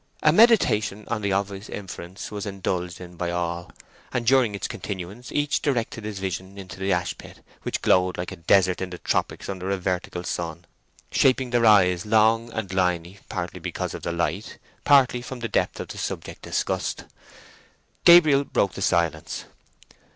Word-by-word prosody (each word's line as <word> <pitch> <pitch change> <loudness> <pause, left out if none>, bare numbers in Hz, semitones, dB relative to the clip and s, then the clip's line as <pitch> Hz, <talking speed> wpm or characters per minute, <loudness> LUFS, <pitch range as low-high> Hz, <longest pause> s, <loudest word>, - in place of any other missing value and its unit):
A 150 - +6
meditation 115 - +4
on 115 -2 -1
the 100 -1 -1
obvious 100 +1 -2
inference 95 -2 -7
was 105 0 -5
indulged 90 -3 -3
in 90 -1 -11
by 85 0 -2
all, 85 0 -3 0.4
and 120 -1 -2
during 120 -4 +4
its 100 - -3
continuance 100 +5 -7
each 145 -1 0
directed 115 -5 -1
his 105 -2 -5
vision 95 0 -5
into 95 -1 -9
the 95 +1 0
ashpit, 90 0 -3 0.2
which - - -3
glowed 90 0 +3
like 90 - -4
a - - -6
desert 95 +2 +3
in 95 - -3
the 90 - -7
tropics - - -2
under 95 -1 -4
a 100 - +1
vertical 90 -1 -3
sun, 85 -1 -4 0.5
shaping 130 -1 +3
their 120 -1 +4
eyes 90 -4 +5
long 110 +2 +3
and 110 -4 -4
liny, 90 0 0
partly 85 -2 -4
because - - -4
of - - -6
the 85 - -3
light, 85 +4 -2 0.3
partly 135 -4 +5
from 125 +1 -7
the 115 - -3
depth - - 0
of - - -6
the - - -7
subject - - -5
discussed. - - -2 1.0
Gabriel 155 -5 +7
broke 100 -8 0
the - - -7
silence. 80 -4 0
95 Hz, 170 wpm, -25 LUFS, 90-115 Hz, 1.0 s, Gabriel